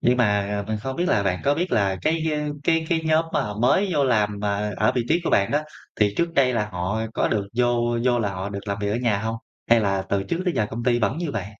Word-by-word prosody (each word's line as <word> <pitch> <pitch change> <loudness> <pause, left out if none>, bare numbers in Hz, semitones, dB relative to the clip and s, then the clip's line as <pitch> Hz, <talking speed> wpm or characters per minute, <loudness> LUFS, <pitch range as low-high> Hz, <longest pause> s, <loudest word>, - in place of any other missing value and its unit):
nhưng 125 +1 +3
mà 105 -3 +1
mình 110 -1 -2
không 130 +4 -5
biết 175 - 0
là 100 - +2
bạn 90 -2 -1
có 140 +1 +3
biết 175 +3 -2
là 100 -3 +2
cái, 160 +1 +1
a, 150 0 -2 0.2
cái 165 -1 +2
cái 165 -2 +1
nhóm 160 +1 +3
mà - - +2
họ 105 -2 -5
mới 190 - +3
vô 145 -3 +2
làm 105 -5 +1
mà 105 0 -1
ở 110 - +2
vị 125 - +1
trí 170 +3 +2
của - - 0
bạn 100 - +3
đó, 150 +1 +1 0.4
thì 105 -1 +3
trước 170 0 0
đây 130 -3 +3
là 105 -2 -1
họ 90 +5 -2
có - - +1
được 100 -2 -1
vô 120 -1 +1
vô 120 -1 +3
là 105 -3 0
họ 95 +2 -4
được 100 +1 -7
làm 100 0 -2
việc 100 0 -1
ở 110 - 0
nhà 115 -5 +1
hông? 110 +1 -3 0.3
Hay 115 -1 +6
là 95 -2 0
từ 100 -1 0
trước 170 - -3
tới 180 -5 0
giờ 105 - +1
công 115 +1 -5
ty 120 -1 +3
vẫn 110 +5 0
như 170 -4 -2
vậy? 100 -4 -3
115 Hz, 285 wpm, -23 LUFS, 100-140 Hz, 0.4 s, Hay